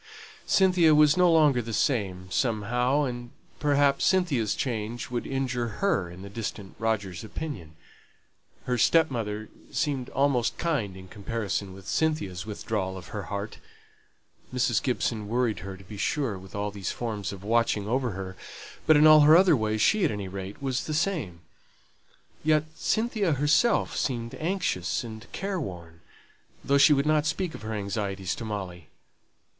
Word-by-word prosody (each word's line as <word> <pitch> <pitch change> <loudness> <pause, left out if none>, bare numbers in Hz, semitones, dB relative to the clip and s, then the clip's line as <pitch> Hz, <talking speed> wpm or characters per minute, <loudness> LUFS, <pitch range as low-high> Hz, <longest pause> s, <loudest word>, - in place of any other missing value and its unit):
Cynthia 180 -5 +5
was 150 -1 +6
no 180 -1 +5
longer 150 -6 +4
the 115 0 -6
same, 100 -7 0
somehow: 125 +5 +1
and 120 -2 -4 0.3
perhaps 145 -2 +2
Cynthia's 160 - +2
change 120 -1 -3
would 120 -1 -3
injure 130 -3 -1
her 160 - +1
in 90 +2 -10
the - - -7
distant 105 -2 -6
Roger's 100 -6 -2
opinion. 105 - -7 0.9
Her 125 -1 -1
stepmother 115 -9 +1 0.2
seemed 140 -6 -1
almost 135 -4 +1
kind 115 - -1
in 95 0 -11
comparison 100 -1 -3
with 95 0 -12
Cynthia's 110 - -1
withdrawal 100 -3 -3
of 85 -4 -10
her 105 -2 -5
heart; 100 +1 -5 0.9
Mrs. 125 -3 +1
Gibson 115 -4 -1
worried 120 0 0
her, 95 -1 -7
to 95 - -14
be 105 +3 -10
sure, 130 0 -1
with 95 +1 -11
all 105 0 -2
these 100 -3 -4
forms 105 -6 -4
of 100 -1 -9
watching 110 -2 +1
over 125 +2 0
her; 95 0 -6 0.5
but 155 -1 +7
in 150 - +6
all 155 0 +9
her 150 +2 +8
other 180 -3 +5
ways, 110 -2 0
she, 215 -2 +3
at 165 - +3
any 105 -4 -4
rate, 95 +1 -7
was 130 -2 -1
the 155 - -2
same. 150 - -1 1.0
Yet 155 -1 +3
Cynthia 215 -1 0
herself 150 - +2
seemed 115 -3 -2
anxious 160 - -1
and 110 -1 -9
care 195 -1 -3
worn, 85 - -8 0.6
though 140 0 +3
she 145 - +7
would 140 -1 +3
not 155 0 +2
speak 180 -1 -2
of - - -9
her 110 +1 -5
anxieties 100 -2 -3
to - - -6
Molly. 95 -6 -6
115 Hz, 160 wpm, -27 LUFS, 100-150 Hz, 1.0 s, all